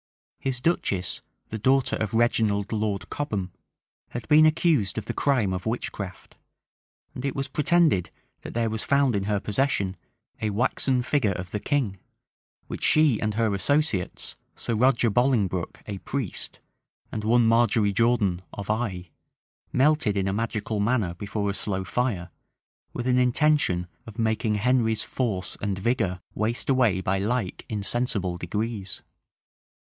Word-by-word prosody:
His 130 -2 -2
duchess, 100 - 0 0.3
the 110 - -4
daughter 130 +4 +3
of 110 0 -2
Reginald 110 -3 +2
Lord 105 -3 -2
Cobham, 105 -11 -2 0.6
had 120 -1 -6
been 155 +1 +7
accused 155 - +2
of 110 - -3
the - - -3
crime 120 -9 +1
of 90 +3 -4
witchcraft; 100 -4 -5 0.8
and 125 - -7
it 140 - -2
was 135 0 -2
pretended, 150 - +2 0.3
that - - -8
there 115 -1 +1
was 110 -1 -2
found 140 -4 +3
in 100 -1 -1
her 105 -1 +1
possession 105 -4 0 0.5
a 110 - 0
waxen 125 +3 +1
figure 125 -7 +1
of 90 0 -6
the 105 - -2
king, 110 -7 -1 0.7
which - - -7
she 155 -7 +4
and 105 -1 -1
her 110 -2 +1
associates, 115 - 0 0.2
Sir 115 - -3
Roger 120 0 +3
Bolingbroke, 105 -7 +1
a 100 -2 -5
priest, 130 -3 -4 0.5
and 110 - -4
one 120 +2 +4
Margery 115 -2 +3
Jordan, 105 -5 +2
of 100 0 -4
Eye, 95 -7 -3 0.6
melted 140 -6 +3
in 95 0 +1
a 95 - 0
magical 110 0 -2
manner 105 -4 +1
before 100 +2 -2
a - - -4
slow 95 -1 -1
fire, 95 -5 -1 0.6
with 120 - -4
an 125 0 +3
intention 125 -8 +2 0.2
of 110 0 -10
making 110 -1 +1
Henry's 115 0 +2
force 105 -8 -2
and 100 -2 -1
vigor 100 -4 0
waste 115 +6 0
away 120 -8 +3
by 95 +1 0
like 105 -1 -1
insensible 100 -4 -1
degrees. 105 +2 -3
110 Hz, 145 wpm, -26 LUFS, 100-125 Hz, 0.8 s, been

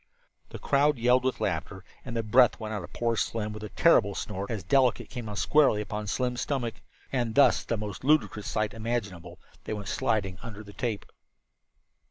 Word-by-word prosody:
The - - -8
crowd 145 0 +2
yelled 125 +2 +3
with 130 0 -1
laughter, 95 +2 -3 0.2
and 120 -2 -5
the 115 - 0
breath 120 +3 +4
went 110 -1 -5
out 105 -4 -4
of - - -10
poor 115 -1 0
Slim 105 -1 -2
with 110 - -8
a 105 - -6
terrible 100 -11 +4
snort, 100 +2 -4
as 110 -6 -3
Delicate 125 +6 +2
came 120 -4 -6
down 105 - -5
squarely 140 -3 +3
upon 105 0 -4
Slim's 125 +3 -1
stomach. 125 -6 -2 0.4
And 120 -4 -1
thus, 140 - +5
the 115 - -2
most 105 0 -6
ludicrous 140 -7 +2
sight 110 -1 -1
imaginable, 100 -7 -4 0.3
they - - -3
went 105 -2 -6
sliding 105 -8 -1
under 110 -2 -8
the 100 -1 -13
tape. 115 -4 -3
110 Hz, 190 wpm, -28 LUFS, 105-125 Hz, 0.4 s, thus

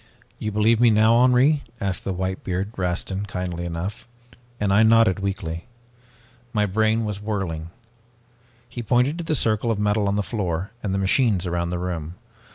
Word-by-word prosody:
"'You 110 - -3
believe 110 +2 +3
now, 110 -1 +5
Henri?' 130 +4 +4 0.2
asked 95 -4 -3
the 95 - -1
whitebeard, 95 +2 -3
Rastin, 95 +2 -2
kindly 90 -2 -4
enough, 85 +6 -5 0.5
and 100 -1 +1
I 105 - +5
nodded 110 -3 +5
weakly. 95 -3 -4 0.9
My 105 -2 +2
brain 110 +3 +1
was 105 -1 -4
whirling. 95 -7 -3 1.0
"He 120 0 -6
pointed 125 +8 +1
to - - -3
the 160 -1 0
circle 110 -2 +1
of 115 - +1
metal 105 0 +1
on 100 - +1
the 105 - 0
floor 95 -3 -3
and 100 - -2
the 95 - 0
machines 95 0 +2
around 85 -1 -1
the 90 - -2
room. 85 -2 -4
100 Hz, 165 wpm, -23 LUFS, 90-110 Hz, 1.0 s, now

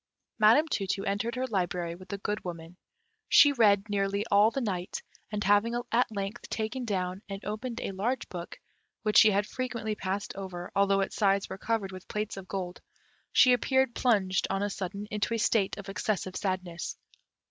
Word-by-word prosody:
Madame 230 +9 +6
Tu 200 -10 -1
tu 195 +1 -1
entered 220 +4 -1
her 255 +1 -1
library 180 -6 -1
with 185 +2 -13
the 200 - -3
Good 210 +1 -3
Woman. 170 -1 -7 0.5
She 290 - +8
read 210 -5 +4
nearly 200 0 0
all 205 +2 +6
the 250 - -3
night, 190 -7 -3 0.3
and 210 -1 -2
having 210 +4 +3
at 240 0 +2
length 200 +2 -5
taken 235 +3 -3
down 185 -3 -2
and 195 0 -6
opened 235 +3 -4
a - - -3
large 225 +7 -2
book, 175 -1 -7 0.4
which 215 -1 +5
she 220 - +8
had 200 0 +2
frequently 235 -3 -3
passed 200 0 -3
over, 185 -2 -6
although 195 0 +3
its 195 - -2
sides 200 -2 +2
were 190 - -6
covered 215 -3 -1
with 185 0 -10
plates 210 0 -3
of 195 -1 -9
gold, 180 -2 -5 0.5
she 255 -2 +6
appeared 265 0 +2
plunged, 200 -7 +2
on 195 +1 0
a 205 - -1
sudden, 195 +2 -4
into 210 +2 0
a - - 0
state 210 -2 +1
of 200 -1 -8
excessive 195 -1 -2
sadness. 185 -3 -3
200 Hz, 185 wpm, -29 LUFS, 190-225 Hz, 0.5 s, She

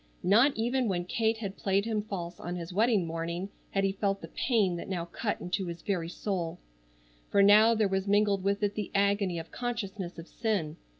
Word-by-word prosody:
Not 235 +9 +5
even 245 +2 +1
when 175 -3 -1
Kate 220 +4 +1
had 200 -3 -5
played 195 +1 +1
him 220 -2 0
false 180 -5 -6
on 175 +1 -4
his 175 0 -6
wedding 215 -2 +3
morning 170 +3 -3 0.2
had 195 - 0
he 195 - +2
felt 195 0 -1
the - - -9
pain 210 -8 +1
that - - -7
now 175 -3 -2
cut 205 +5 -3
into 180 +1 -2
his 170 0 -7
very 180 -6 -1
soul. 175 -3 -3 0.7
For 200 - +4
now 215 +3 +7
there 215 -2 +2
was 190 0 -1
mingled 205 -1 +3
with 200 +1 0
it 205 0 +1
the 210 -2 -4
agony 200 -2 +2
of 165 0 -7
consciousness 210 -7 -4
of 165 +1 -9
sin. 190 -9 -2
195 Hz, 200 wpm, -29 LUFS, 175-215 Hz, 0.7 s, now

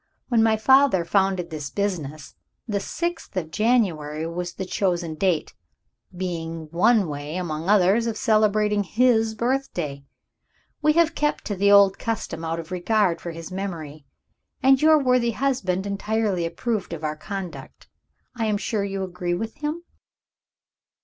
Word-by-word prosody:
When 235 -3 +3
my 220 -1 +3
father 265 -5 +4
founded 190 -2 +1
this 150 -3 -5
business, 155 -8 -3 0.3
the 205 -3 -1
sixth 340 - -4
of 160 -3 -3
January 170 -9 +1
was 175 +1 -4
the 190 - -5
chosen 175 -3 -1
date 170 -1 0 0.6
being 165 -3 -4
one 200 +3 +3
way, 145 +1 -5
among 165 -1 -3
others, 210 +3 +4
of 225 - -2
celebrating 215 -3 +2
his 225 +1 +2
birthday. 210 - -2 0.8
We 305 0 +4
have 335 0 +3
kept 295 0 -1
to 205 - -2
the 200 +2 +3
old 200 -1 +6
custom, 225 -7 -3
out 165 0 -2
of 165 +2 -9
regard 185 -1 +1
for 175 - -5
his 165 +1 -8
memory; 160 -7 -6 0.6
and 270 0 +5
your 310 0 +6
worthy 250 -4 +2
husband 210 -8 -1
entirely 200 -3 -1
approved 210 +1 -3
of 160 -1 -7
our 155 0 -2
conduct. 190 +2 -8 0.5
I 225 -2 -1
am 210 -1 +1
sure 210 0 -2
you 195 -1 -3
agree 180 -1 -3
with 220 +5 -5
him?" 305 +3 -4
195 Hz, 150 wpm, -24 LUFS, 170-225 Hz, 0.8 s, old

